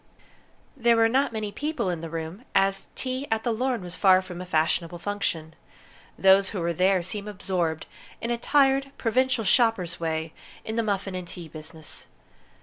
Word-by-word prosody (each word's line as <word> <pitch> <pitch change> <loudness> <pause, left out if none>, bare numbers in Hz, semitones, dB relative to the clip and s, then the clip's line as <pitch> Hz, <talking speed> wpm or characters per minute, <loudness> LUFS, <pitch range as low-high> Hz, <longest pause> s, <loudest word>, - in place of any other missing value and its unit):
There 235 -3 +4
were 225 0 +5
not 265 +3 +2
many 215 -2 -3
people 295 - -2
in 170 -2 -4
the 165 - -5
room, 165 +6 -5
as 195 0 +2
tea 260 +2 -3
at 225 0 0
the 240 - +1
Lorne 245 -1 -1
was 175 -1 -7
far 190 0 +5
from 180 -1 -8
a 180 - -7
fashionable 165 +1 +1
function. 170 -4 -3 0.6
Those 195 0 +5
who 200 - -4
were 170 0 0
there 185 +1 +3
seemed 200 +3 -5
absorbed, 180 -5 -2 0.3
in 235 - -3
a 240 - +1
tired, 275 0 +3
provincial 255 0 +1
shoppers' 195 -5 +2
way, 160 -1 -2 0.3
in 220 - -3
the 230 - +2
muffin 200 -3 -1
and 180 -1 -5
tea 170 -1 -8
business. 155 0 -9
195 Hz, 175 wpm, -26 LUFS, 170-230 Hz, 0.6 s, were